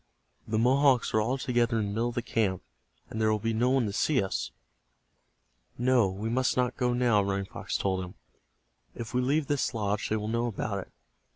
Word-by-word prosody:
"The 110 - -1
Mohawks 130 +2 +3
are 110 - +3
all 125 +5 0
together 120 -3 +1
in 110 - 0
the 100 - -3
middle 115 +3 0
of 120 - -8
the 120 - -1
camp, 100 -6 0 0.5
and 110 - -3
there 110 0 +3
will 110 - +2
be 115 +2 -2
no 120 +3 +2
one 130 -2 +2
to 100 - -3
see 140 +6 +2
us." 95 - -3 1.3
"No, 125 -4 +3
we 100 +4 -4
must 130 +3 +1
not 125 -1 +1
go 125 -1 +1
now," 120 -4 +3
Running 100 0 -1
Fox - - -4
told 95 -1 -1
him. 90 - -9 0.8
"If 115 0 -7
we 125 - +2
leave 145 +4 +1
this 140 -3 -1
lodge 105 -1 -1
they 110 - +1
will 105 0 -4
know 115 +2 0
about 105 -2 -3
It. - - -30
115 Hz, 210 wpm, -28 LUFS, 105-125 Hz, 1.3 s, Mohawks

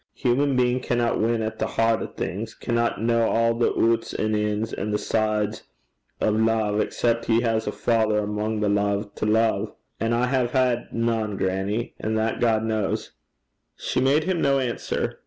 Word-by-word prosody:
Human 135 +2 +1
bein' 125 0 +2
canna 120 -2 0
win 115 0 +1
at 110 - -4
the - - 0
hert 115 0 +1
o' - - -3
things, 100 +8 -5
canna 120 -1 0
ken 115 - -3
a' 115 0 +2
the 115 +1 +1
oots 115 0 +1
an' 110 0 0
ins, 105 +1 -1
a' - - -3
the 105 0 0
sides 105 0 -1 0.6
o' - - +2
love, 110 -1 +1
excep' 115 +2 0
he 115 0 +3
has 115 -2 0
a - - 0
father 110 -2 +1
amo' 105 +1 -2
the 105 - +1
lave 100 0 0
to - - -3
love; 110 -1 +1 0.2
an' 115 +1 0
I 120 +1 +2
hae 125 -1 +1
had 125 -1 0
nane, 115 -3 -1
grannie. 95 +5 -1
An' 110 +1 -2
that 110 +1 0
God 110 -2 +2
kens.' 110 -3 -2 0.6
She - - -2
made 140 +4 +3
him 180 -1 -1
no 140 0 +3
answer. 125 -3 -2
115 Hz, 180 wpm, -24 LUFS, 105-120 Hz, 0.6 s, he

